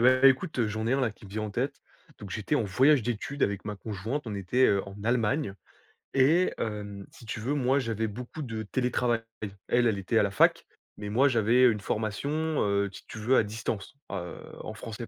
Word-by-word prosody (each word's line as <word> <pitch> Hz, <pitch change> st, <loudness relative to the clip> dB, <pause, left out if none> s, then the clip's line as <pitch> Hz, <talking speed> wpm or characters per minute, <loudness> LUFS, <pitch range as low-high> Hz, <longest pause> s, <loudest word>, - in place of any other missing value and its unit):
bah, 130 Hz, +2 st, +5 dB
écoute, 135 Hz, +1 st, 0 dB
heu, 115 Hz, -, +2 dB
j'en 110 Hz, +1 st, -3 dB
ai 120 Hz, -, +2 dB
un 135 Hz, -, +2 dB
là 125 Hz, -4 st, +1 dB
qui 105 Hz, -, -17 dB
me 100 Hz, -, -11 dB
vient 110 Hz, +2 st, -3 dB
en 105 Hz, -, -3 dB
tête. 125 Hz, +7 st, -2 dB, 0.4 s
Donc 100 Hz, -, -9 dB
j'étais 110 Hz, +9 st, -1 dB
en 145 Hz, -, +3 dB
voyage 130 Hz, +7 st, +4 dB
d'études 120 Hz, +5 st, -3 dB
avec 100 Hz, -1 st, 0 dB
ma 105 Hz, -, -3 dB
conjointe 110 Hz, +8 st, -4 dB
on 110 Hz, -, -3 dB
était, 100 Hz, +7 st, +2 dB
heu, 100 Hz, -1 st, +3 dB
en 100 Hz, -, -9 dB
Allemagne 120 Hz, 0 st, +1 dB, 0.6 s
et 155 Hz, +8 st, +4 dB
hem, 105 Hz, -2 st, -4 dB
si -, -, -15 dB
tu 110 Hz, -, -4 dB
veux 125 Hz, +6 st, -1 dB
moi 135 Hz, -1 st, +2 dB
j'avais 115 Hz, -3 st, -1 dB
beaucoup 125 Hz, +8 st, -7 dB
de 115 Hz, -5 st, -4 dB
télétravail, 125 Hz, 0 st, 0 dB, 0.5 s
elle 120 Hz, 0 st, +3 dB
elle 110 Hz, -3 st, +1 dB
était 100 Hz, +4 st, 0 dB
à -, -, +5 dB
la 100 Hz, -, 0 dB
fac, -, -, +4 dB, 0.3 s
mais 105 Hz, 0 st, -5 dB
moi 125 Hz, +7 st, +4 dB
j'avais, 120 Hz, +1 st, +4 dB
heu, 120 Hz, -, +7 dB
une 105 Hz, -, -3 dB
formation 110 Hz, +5 st, -2 dB, 0.3 s
heu 100 Hz, 0 st, +1 dB
si 95 Hz, -, -12 dB
tu -, -, -9 dB
veux 120 Hz, +5 st, +3 dB
à -, -, +5 dB
distance 110 Hz, +1 st, -4 dB
a 95 Hz, -1 st, -3 dB
heu, 85 Hz, -, -7 dB, 0.3 s
en -, -, -5 dB
français 115 Hz, +1 st, -7 dB
110 Hz, 225 wpm, -28 LUFS, 105-130 Hz, 0.6 s, heu